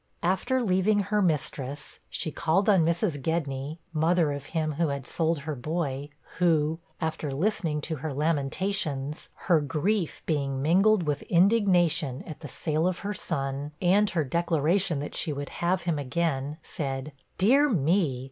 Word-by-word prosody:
After 190 +8 +1
leaving 200 +1 +3
her 210 - +4
mistress, 145 -4 -2
she 155 - -3
called 165 +8 +1
on 195 -5 +5
Mrs. 170 -2 0
Gedney, 145 -1 -2 0.2
mother 160 0 +2
of 145 0 -5
him 155 -2 -1
who 160 +3 0
had 140 -2 -3
sold 165 -1 0
her 155 +2 -4
boy; 145 0 -3 0.3
who, 160 -2 +2 0.2
after 160 -2 -2
listening 160 -1 0
to 160 +1 -3
her 155 +3 -4
lamentations, 150 0 -1 0.2
her 170 -5 +4
grief 165 +6 -1
being 140 -4 -1
mingled 190 +7 +4
with 150 -3 -1
indignation 175 - +3
at 155 - -8
the 150 - -8
sale 155 +4 -1
of 185 -1 -1
her 205 - -1
son, 140 -4 -3
and 195 +3 +4
her 165 -4 0
declaration 170 +2 +1
that 145 - -6
she 160 - -2
would 145 0 -4
have 180 +1 +1
him 165 -4 0
again 145 0 -1
said, 135 0 -4 0.3
'Dear 270 +10 +5
me! 165 - +1
160 Hz, 155 wpm, -27 LUFS, 145-180 Hz, 0.3 s, on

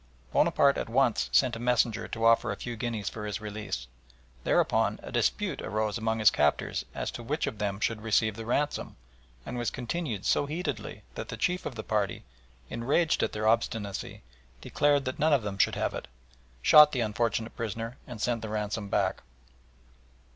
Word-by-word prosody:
Bonaparte 145 -3 +4
at - - -4
once 125 -1 +2
sent 125 -3 +4
a - - -6
messenger 120 -2 +1
to 115 0 -2
offer 115 0 +4
a - - -2
few 120 +3 -6
guineas 110 -4 -3
for 105 -1 -4
his 105 - -3
release. 105 - -5 0.6
Thereupon - - +2
a - - -8
dispute - - 0
arose 110 0 -1
among 110 -1 -1
his 110 -2 +6
captors 75 0 +1
as - - -3
to - - -7
which 145 +7 -1
of 125 -7 -5
them 100 -1 -2
should 110 0 -1
receive 110 -1 +2
the 115 - -6
ransom, 145 +4 -1 0.5
and 125 - -4
was 120 - 0
continued 125 - -4
so 145 - +2
heatedly 145 - -4
that - - -6
the - - -5
chief 180 0 0
of 130 - -7
the 110 - -5
party, 105 -4 -1 0.4
enraged 140 +8 +1
at - - +1
their 110 0 -1
obstinacy, 110 -3 -1 0.4
declaring 145 - +2
that 130 +2 -4
none 155 +1 +4
of 135 -5 +3
them 100 -1 -4
should - - +3
have - - -1
it, - - -6 0.6
shot 150 -1 +8
the 125 - 0
unfortunate 115 0 -1
prisoner 115 +2 -4
and 120 -4 -8
sent 115 +1 0
the 110 - -5
ransom 105 -1 -3
back. - - 0
115 Hz, 185 wpm, -29 LUFS, 105-130 Hz, 0.6 s, shot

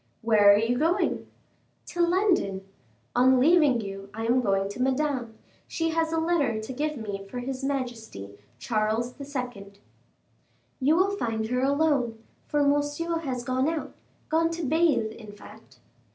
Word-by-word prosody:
"Where 210 -3 +6
are 200 - +6
you 235 +3 0
going?" 330 +4 0 0.6
"To 350 - -2
London. 340 - +1 0.5
On 255 +1 +5
leaving 295 -4 +4
you, 195 -1 -7
I 225 +1 -3
am 245 +2 +3
going 195 -3 +1
to 205 - -6
Madame; 260 -3 -1 0.3
she 330 0 -1
has 325 0 0
a 325 - 0
letter 320 -9 +1
to 220 +4 -6
give 300 +3 -2
me 205 -3 -5
for 250 - -7
his 260 +2 -4
majesty, 240 - -4 0.3
Charles 220 - -1
II." 250 -8 -6 1.1
"You 285 +4 +3
will 380 +3 +3
find 225 - -2
her 250 +1 0
alone, 275 -4 +1 0.3
for 295 -1 +1
Monsieur 290 +4 0
has 260 -6 -4
gone 260 +3 0
out; 305 -4 -4 0.3
gone 330 +1 +2
to 335 0 -4
bathe, 300 -6 +2
in 215 -2 -11
fact." 205 - -15
255 Hz, 150 wpm, -26 LUFS, 220-305 Hz, 1.1 s, Where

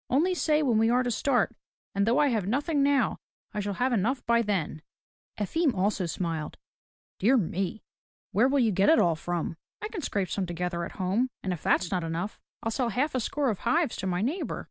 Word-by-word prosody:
Only 325 +9 +3
say 310 -3 +2
when 240 -6 +3
we 225 +1 +4
are 250 +2 +3
to 245 - -1
start, 245 0 +1 0.4
and 200 +1 +1
though 235 - +3
I 295 -1 +4
have 215 -6 0
nothing 285 - +1
now, 275 -5 +2 0.3
I 210 - -2
shall 205 -1 -2
have 250 +3 +1
enough 240 +5 0
by 235 0 +4
then." 185 -8 -2 0.6
Efim 280 - +1
also 190 -1 +1
smiled. 165 -2 -3 0.6
"Dear 245 +7 +4
me! 195 +1 -2 0.5
Where 220 +7 +4
will 280 +1 +2
you 235 -5 +3
get 195 +1 +3
it 320 - +6
all 170 -2 +3
from?" 170 0 -3
" - - -66
I 425 - -3
can 420 -6 -5
scrape 200 - -1
some 195 -3 -1
together 175 0 -2
at - - -9
home, 200 +7 0
and 185 - -1
if 170 - -6
that's 180 - +2
not 180 -2 0
enough, 165 +5 -3 0.2
I'll 225 - -1
sell 240 +1 0
half 265 +8 0
a 255 - +1
score 275 +2 0
of 200 - -5
hives 295 +3 +1
to 190 - -3
my 180 +1 0
neighbor." 305 - -2
220 Hz, 220 wpm, -28 LUFS, 185-265 Hz, 0.6 s, it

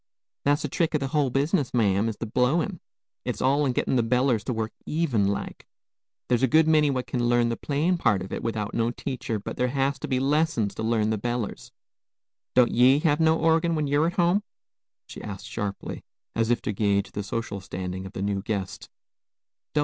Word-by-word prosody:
"That's 145 +1 +2
the - - 0
trick 160 +3 0
o' - - +5
the 135 -2 -3
hul 145 -2 +1
business, 135 0 0
ma'am, 105 -1 +2
is 110 - -5
the - - -4
blowin'. 150 - +1 0.4
It's - - -3
all 140 +3 +2
in - - +2
gettin' 130 - 0
the - - +4
bellers 125 -1 +1
to - - -1
work 110 -1 -2 0.2
even 140 -11 +1
like. 100 - -4 0.6
There's 120 -2 +2
a 130 - +4
good 155 +4 +4
many 155 -2 +4
what 130 -2 -1
kin 120 -2 -1
learn 120 -1 +3
the 115 - -1
playin' 155 +8 0
part 100 - +2
of 95 - -8
it - - -3
without 110 -3 -3
no 115 0 +1
teacher; 120 -2 -4
but 100 - -7
there 125 - +1
has 135 +1 0
to - - -5
be 130 - 0
lessons 140 -6 +1
to - - -6
learn 110 -1 +1
the 110 - -1
bellers. 120 -1 -3 0.8
Don't 125 -1 +5
ye 125 +3 +5
have 150 -2 +2
no 160 0 +4
orgin, 165 +1 +2
when 155 -1 0
ye're 145 +3 +2
at 175 - -2
home?" 175 +3 +2 0.6
she - - -10
asked 100 -2 -7
sharply, 105 -3 -5 0.3
as 115 0 +1
if 120 -1 +1
to - - -1
guage 100 -1 +1
the 105 - -4
social 100 -1 -4
standing 95 0 -5
of 95 - -12
the 95 - -4
new 100 -1 -1
guest. 100 -2 -4
125 Hz, 210 wpm, -26 LUFS, 110-145 Hz, 0.8 s, o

